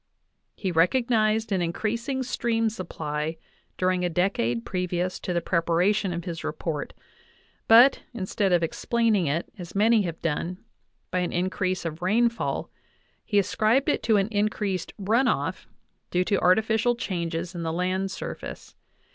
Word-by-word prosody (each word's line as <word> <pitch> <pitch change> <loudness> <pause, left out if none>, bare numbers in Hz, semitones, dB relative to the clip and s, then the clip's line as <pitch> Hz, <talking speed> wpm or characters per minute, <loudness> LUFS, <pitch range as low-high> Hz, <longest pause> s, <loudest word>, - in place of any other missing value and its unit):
He 190 -3 -2
recognized 220 +4 +2
an 190 -2 +1
increasing 230 +10 -2
stream 230 -2 0
supply 160 -5 -4 0.4
during 185 0 +1
a 180 - +1
decade 160 - 0
previous 180 0 -2
to - - -4
the 170 -1 0
preparation 180 +4 +1
of 170 0 -4
his 170 -3 -5
report; 155 -1 -4 0.7
but, 240 +5 +7
instead 195 -3 -1
of 175 -1 +3
explaining 215 +1 +1
it, 155 +5 0
as 175 +1 -8
many 220 +2 +4
have 170 -4 -4
done, 165 +3 -2 0.5
by 180 - +1
an 180 - -1
increase 185 0 -1
of 165 +1 -4
rainfall, 230 +5 0 0.5
he 205 - 0
ascribed 215 +6 +2
it - - +1
to 220 -1 +3
an 195 0 +2
increased 205 -3 -1
"run 225 +6 +2
off" - - -1 0.4
due 180 +1 +1
to 200 +1 +1
artificial 220 +5 +3
changes 170 -4 -3
in 175 - -5
the 165 -1 -2
land 185 +3 -1
surface. - - -7
185 Hz, 145 wpm, -26 LUFS, 170-220 Hz, 0.7 s, but